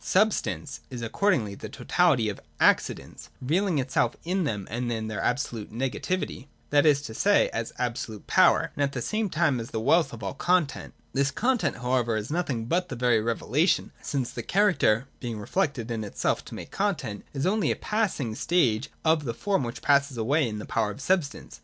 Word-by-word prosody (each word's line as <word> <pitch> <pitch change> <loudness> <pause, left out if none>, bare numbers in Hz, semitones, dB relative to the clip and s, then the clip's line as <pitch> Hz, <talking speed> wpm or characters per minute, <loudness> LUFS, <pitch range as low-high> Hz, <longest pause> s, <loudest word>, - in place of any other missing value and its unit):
j - - -18
Substance 195 -7 +1
is 125 -3 -6
accordingly 115 - +1
the - - -8
totality 155 -11 +2
of 105 - -3
the - - -18 0.2
Ac - - +7
cidents, - - -9
revealing 170 +6 +1
itself 130 -3 +1
in 180 +1 0
them 105 -8 -3
as 120 +3 -2 0.2
their 110 -2 -3
absolute 120 -4 -2
nega 125 +5 -3
tivity, 145 -3 -3 0.2
(that 145 +1 +5
is 140 -2 +4
to 110 - -6
say, 205 - +3
as 115 0 -3
absolute 120 -3 -3
power,) - - +4
and - - -3
at 140 -1 +1
the 125 - -2
same 215 -1 -1
time 155 -6 +1
as 115 - -6
the 110 - -3
wealth 155 +8 +3
of 115 -3 -9
all 95 - -3
content. 175 -5 0 0.2
This 140 0 +2
content 245 - 0
however 125 -2 0
is 110 +5 -4
nothing 140 -9 -1
but 175 +8 0
that 130 - -4
very 120 -2 +3
revelation, 120 - +1
since 135 -4 -2
the - - -5
character 180 - +2
(being 120 -4 -4
reflected 125 - -1
in 115 -2 -2
itself 105 - -1
to - - -8
make - - -8
content) 155 - -2
is 135 - -1
only 210 +3 +2
a - - +1
passing 200 - -1
stage 125 -4 +1 0.2
of 160 -1 +3
the 115 -2 -3
form 195 -3 0
which 120 0 -6
passes 140 -2 +3
away 135 +4 +2
in 105 - -5
the 105 - -6
power 110 -2 0
of 105 - -7
substance. 155 -1 -1
135 Hz, 200 wpm, -27 LUFS, 115-175 Hz, 0.2 s, Ac